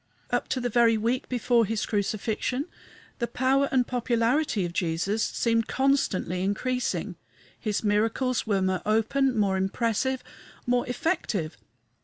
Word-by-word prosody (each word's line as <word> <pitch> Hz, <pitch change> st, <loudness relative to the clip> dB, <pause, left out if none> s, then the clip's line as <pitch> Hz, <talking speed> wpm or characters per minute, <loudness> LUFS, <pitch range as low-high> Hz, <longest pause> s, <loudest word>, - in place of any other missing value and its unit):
Up -, -, 0 dB
to 260 Hz, -, -1 dB
the 245 Hz, -, -1 dB
very 230 Hz, -1 st, +4 dB
week 235 Hz, +4 st, -1 dB
before 240 Hz, -1 st, +2 dB
his 220 Hz, 0 st, -1 dB
crucifixion 215 Hz, +6 st, -1 dB, 0.5 s
the 235 Hz, -, 0 dB
power 265 Hz, +3 st, +2 dB
and 255 Hz, -2 st, +3 dB
popularity 240 Hz, -, +1 dB
of 170 Hz, -, -5 dB
Jesus 175 Hz, +5 st, -1 dB
seemed 230 Hz, 0 st, +1 dB
constantly 260 Hz, -10 st, +1 dB
increasing. 250 Hz, +6 st, -1 dB, 0.4 s
His 215 Hz, -2 st, -2 dB
miracles 225 Hz, +4 st, +1 dB
were 195 Hz, -3 st, +1 dB
more 185 Hz, -1 st, 0 dB
open, 235 Hz, +4 st, +1 dB
more 195 Hz, -2 st, +2 dB
impressive, 230 Hz, +6 st, 0 dB, 0.4 s
more 245 Hz, 0 st, +1 dB
effective. 235 Hz, -, -1 dB
230 Hz, 130 wpm, -27 LUFS, 205-255 Hz, 0.5 s, very